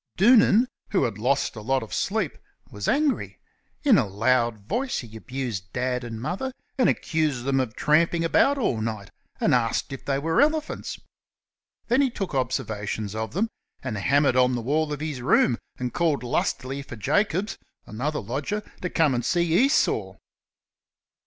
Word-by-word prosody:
Doonan, 230 +2 +6 0.2
who 190 -8 +2
had 110 -5 -2
lost 130 +4 +1
a 110 - -7
lot 130 +3 0
of 110 - -9
sleep, - - -1 0.4
was 105 -1 -5
angry. 290 -1 +1 0.5
In 260 -9 +6
a 115 - 0
loud 115 +3 +1
voice 255 - -1
he 115 -2 -7
abused 110 -5 -5
Dad 125 0 -1
and 115 -2 -6
Mother, 195 - -3 0.2
and 255 - +3
accused 150 -6 0
them 135 -1 +2
of 125 -4 -2
tramping 165 +2 +2
about 275 +11 +3
all 125 - 0
night, 110 -3 -4 0.3
and - - +2
asked 120 +2 +1
if 135 - -7
they 135 -1 0
were 160 - +2
elephants. 310 +1 0 0.9
Then 240 +4 +3
he 275 - +3
took 195 -7 -5
observations 110 -5 -2
of 110 0 -4
them, 220 +6 0 0.3
and 130 -4 -3
hammered 135 +6 +2
on 125 0 +4
the 120 - -2
wall 150 +4 0
of 150 -1 -4
his 150 -5 -4
room, 120 -1 +3 0.2
and 125 -1 -3
called 160 -6 +1
lustily 130 +2 -1
for 135 - -9
Jacobs, 185 - 0 0.3
another 145 +7 -3
lodger, 145 - -3 0.2
to 180 - -2
come 160 -6 +2
and 120 -1 -1
see 170 +5 +1
Esau. 280 - +1
135 Hz, 165 wpm, -25 LUFS, 120-175 Hz, 0.9 s, Doonan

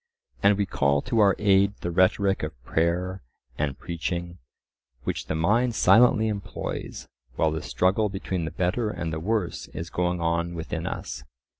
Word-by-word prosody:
And 100 0 +5
we 100 - +1
call 70 -5 +1
to 120 -3 0
our 100 -2 +5
aid 100 -1 +3
the 85 - -2
rhetoric 95 +2 +2
of 75 -4 -5
prayer 90 +6 0 0.4
and 70 -2 -1
preaching, 85 +1 -4 0.6
which - - -3
the - - -1
mind 110 +9 +2
silently 110 -1 +5
employs 100 -2 -5 0.3
while 80 +1 +2
the 80 0 -3
struggle 100 +4 +1
between 95 -3 -3
the - - -2
better 95 +7 -1
and 85 -5 -4
the 80 - -2
worse 100 +1 -2
is 85 +1 -5
going 90 0 0
on 85 +1 0
within 80 -1 -4
us. - - -5
90 Hz, 160 wpm, -26 LUFS, 85-100 Hz, 0.6 s, And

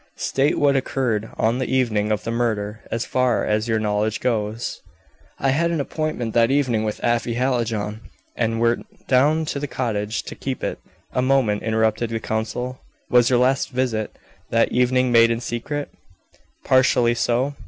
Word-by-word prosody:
"State 140 +3 +1
what 140 -1 +3
occurred 125 -5 -1
on 115 +3 +1
the 130 - -2
evening 110 -5 +1
of 105 - -1
the 115 - -3
murder, 110 -3 -1
as 115 - -2
far 125 -2 +1
as 110 +1 0
your 110 -1 +1
knowledge 105 0 0
goes." 110 -2 -2 0.6
"I 135 - 0
had 170 +5 +1
an 170 -2 -1
appointment 140 -6 -3
that 115 0 +4
evening 130 -6 +1
with 105 -1 -3
Afy 120 0 +1
Hallijohn, 115 -4 -1 0.3
and 115 -1 0
went 115 0 +1 0.2
down 150 +5 +3
to 145 - -3
their 145 - -3
cottage 110 -4 -2
to - - -7
keep 135 -1 -5
it - - -3 0.2
" - - -34
"A 125 - +1
moment," 130 -6 +2
interrupted 110 +1 0
the 115 0 -2
counsel. 120 +4 -3 0.3
"Was 120 -1 +5
your 125 +1 +4 0.2
visit 125 -4 -2 0.3
that 115 0 +2
evening 125 0 +2
made 115 -1 +6
in 115 0 0
secret?" 140 +5 -4 0.7
"Partially 125 -2 +4
so. 120 +4 0
120 Hz, 165 wpm, -22 LUFS, 110-130 Hz, 0.7 s, made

